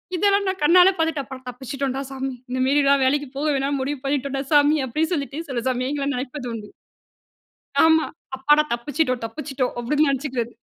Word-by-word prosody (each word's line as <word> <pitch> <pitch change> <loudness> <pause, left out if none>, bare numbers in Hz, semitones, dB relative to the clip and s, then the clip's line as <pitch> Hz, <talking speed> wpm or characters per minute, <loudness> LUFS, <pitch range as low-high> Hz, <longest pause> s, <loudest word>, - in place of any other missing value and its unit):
இதெல்லாம் 400 +2 +2
நான் 380 - -4
கண்ணால 360 +4 +7
பார்த்துட்டு 320 -3 0
அப்புறம், 260 -1 -10
"தப்பிச்சுட்டோம்டா 265 +2 -4
சாமி. 270 0 -4 0.2
இந்தமேரிலாம் 275 +2 +3
வேலைக்கு 285 +1 +1
போக 300 - -1
வேணான்னு 275 +1 -1
முடிவு 275 +1 -3
பண்ணிட்டோம்டா 275 -1 -1
சாமி" 295 +1 +5
அப்படீன்னு 315 +7 -1
சொல்லிட்டு 280 -1 -4
சில 250 - -1
சமயங்கள்ல 275 +3 -2
நினைப்பதுண்டு. 250 -4 -5 1.2
ஆமா. 320 0 +5 0.3
அப்பாடா 295 +3 +4
"தப்பிச்சிட்டோம், 255 +1 -1
தப்பிச்சிட்டோம்" 265 +1 -3
அப்படீன்னு 295 +6 +2
நெனைச்சுக்கிறது. 260 -4 -2
275 Hz, 140 wpm, -23 LUFS, 260-295 Hz, 1.2 s, கண்ணால